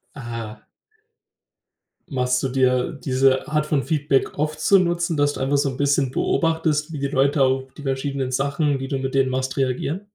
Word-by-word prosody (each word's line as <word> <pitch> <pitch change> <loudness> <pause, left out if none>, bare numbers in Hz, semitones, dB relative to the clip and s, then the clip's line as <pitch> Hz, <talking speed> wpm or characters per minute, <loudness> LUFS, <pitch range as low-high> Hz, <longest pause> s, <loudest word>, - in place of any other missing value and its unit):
Ah. 115 -4 -7 1.5
Machst 125 -2 0
du 135 - 0
dir 125 -1 +1
diese 130 0 +2
Art 150 0 0
von 145 -4 0
Feedback 145 -4 0
oft 155 +1 -2
zu 195 -1 +5
Nutzen, 175 -2 0
dass 145 0 +2
du - - -7
einfach 135 +2 +1
so 140 -1 +1
'n 130 - -6
bisschen 140 -2 +1
beobachtest, 160 0 0
wie 150 - -5
die 140 - -1
Leute 140 +1 +1
auf 130 0 0
die 145 - -11
verschiedenen 135 -1 -2
Sachen, 140 +2 0
die 135 - -4
du 135 - -1
mit 135 0 -3
denen 135 -1 +3
machst, 130 0 -2
reagieren? 135 +7 -1
135 Hz, 185 wpm, -22 LUFS, 130-150 Hz, 1.5 s, zu